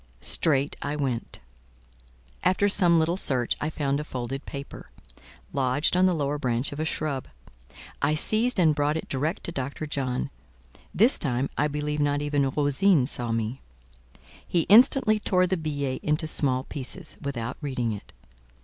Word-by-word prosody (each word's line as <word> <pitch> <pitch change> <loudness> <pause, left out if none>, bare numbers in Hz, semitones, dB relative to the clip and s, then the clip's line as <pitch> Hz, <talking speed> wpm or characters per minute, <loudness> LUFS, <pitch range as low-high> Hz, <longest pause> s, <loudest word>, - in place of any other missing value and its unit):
Straight 140 - +2
I 145 +1 -2
went. 130 -5 -3 1.1
After 185 +2 +3
some 175 -4 +4
little 165 +2 +1
search, 125 -9 0
I 155 - -1
found 140 -2 -1
a - - -3
folded 130 0 -5
paper, 140 0 -8 0.6
lodged 135 +5 +1
on 185 +1 +4
the 180 - +1
lower 145 -1 -1
branch 125 0 0
of 145 - -7
a 155 - -1
shrub; 150 -4 -2 0.7
I 150 +2 +2
seized 220 +10 +3
and 160 -4 +5
brought 145 +1 0
it - - -6
direct 150 +6 -2
to - - -3
Dr. 140 0 -4
John. 130 -4 -2 0.6
This 230 +7 +4
time, 130 -2 -1
I 150 - +1
believe 150 0 -3
not 145 0 +1
even 145 -2 +1
Rosine 145 +3 +3
saw 120 -3 -1
me. 115 +3 -2 0.9
He 175 - +2
instantly 215 - +5
tore 185 -3 +2
the 185 +1 0
billet 145 -5 -3
into 150 +1 0
small 130 -4 +1
pieces, 155 +5 -6
without 125 -4 -4
reading 125 -5 -2
it. 100 - -10
145 Hz, 160 wpm, -26 LUFS, 135-160 Hz, 1.1 s, and